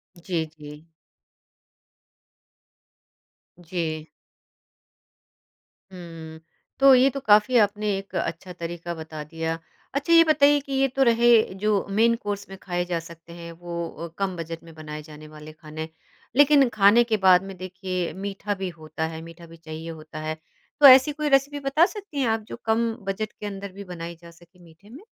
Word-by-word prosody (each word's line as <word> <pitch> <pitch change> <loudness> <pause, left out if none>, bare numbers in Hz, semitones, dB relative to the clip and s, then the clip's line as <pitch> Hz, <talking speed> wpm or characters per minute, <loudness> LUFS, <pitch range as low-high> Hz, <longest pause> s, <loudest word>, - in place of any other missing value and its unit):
जी, 170 -1 -3
जी। 150 +1 -12 2.7
जी। 160 -3 -4 1.9
हुँ, 165 -3 -10 0.4
तो 275 0 +8
ये 255 +2 +5
तो 275 - -5
काफ़ी 215 +4 +5
आपने 210 +1 -4
एक 195 0 -9
अच्छा 170 +2 -4
तरीका 170 0 -6
बता 160 -2 -8
दिया, 160 +1 -4 0.4
अच्छा 285 +5 +1
ये 330 0 +9
बताइए 290 -2 +4
कि 275 0 -7
ये 270 0 +3
तो 270 - +4
रहे 235 +1 +3 0.3
जो 210 -2 +2
मेन 230 +1 +5
कोर्स 205 -1 -4
में 195 - -9
खाए 175 -1 -2
जा 175 -1 -2
सकते 165 0 -13
हैं, 170 0 -9
वो 170 0 -5
अ, 170 - -8
कम 195 -2 -2
बजट 165 0 -6
में 165 -1 -14
बनाए 155 -1 -8
जाने 155 0 -12
वाले 155 0 -12
खाने। 155 0 -8 0.5
लेकिन 285 -1 +6
खाने 205 +4 +6
के 225 -2 0
बाद 190 -2 +5
में 195 0 -8
देखिए 185 -1 -4
मीठा 200 +1 -4
भी 190 -2 -4
होता 160 -1 -5
है 160 - -7
मीठा 165 +1 -12
भी 165 0 -14
चाहिए 160 0 -8
होता 155 -1 -9
है, 155 0 -3 0.4
तो 295 - +6
ऐसी 265 +2 +8
कोई 300 0 -2
रेसिपी 280 +1 +2
बता 280 +4 +3
सकती 400 -7 -7
हैं 265 - +1
आप 225 0 0
जो - - -7
कम 225 +1 +1
बजट 195 +2 -3
के - - -10
अंदर 200 -1 -6
भी 200 +2 -9
बनाई 170 -2 -7
जा 170 0 -13
सके 175 +2 -22
मीठे 170 +5 -19
में? 275 - -12
185 Hz, 170 wpm, -24 LUFS, 165-225 Hz, 2.7 s, ये